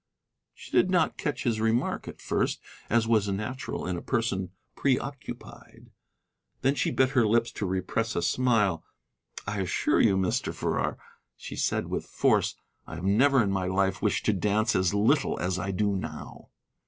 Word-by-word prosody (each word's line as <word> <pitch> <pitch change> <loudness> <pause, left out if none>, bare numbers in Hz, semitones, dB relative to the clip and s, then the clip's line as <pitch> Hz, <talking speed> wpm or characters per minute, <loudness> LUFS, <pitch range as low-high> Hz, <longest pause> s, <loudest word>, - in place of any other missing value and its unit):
She - - -13
did - - +4
not 175 -3 +1
catch 140 -4 -2
his 115 -3 0
remark 115 +2 0
at - - -9
first, - - 0 0.3
as 115 0 +3
was 110 -3 +3
natural 105 +7 -4
in 90 -1 -2
a - - -5
person 105 -7 -1 0.3
preoccupied. 140 +1 -4 0.7
Then 135 +1 +4
she 135 - 0
bit 130 -1 +2
her 125 -5 +3
lips 115 +2 +2
to 100 - -3
repress 95 +5 -1
a 85 - 0
smile. 105 -7 +2 0.6
"I 105 -1 -3
assure 90 -3 +1
you, 95 - +4
Mr. 95 -1 -1
Farrar," - - -1 0.4
she - - -8
said - - 0
with - - -3
force, - - +2 0.3
"I - - -7
have 85 - -7
never 125 +6 +4
in 100 - 0
my 95 -2 -1
life 95 +1 0
wished 105 0 0
to 110 - +3
dance 105 +4 +1
as 95 +1 +2
little 130 +8 +2
as 90 0 -1
I 95 +2 -3
do 100 +1 0
now." 95 - -7
105 Hz, 170 wpm, -27 LUFS, 95-120 Hz, 0.7 s, did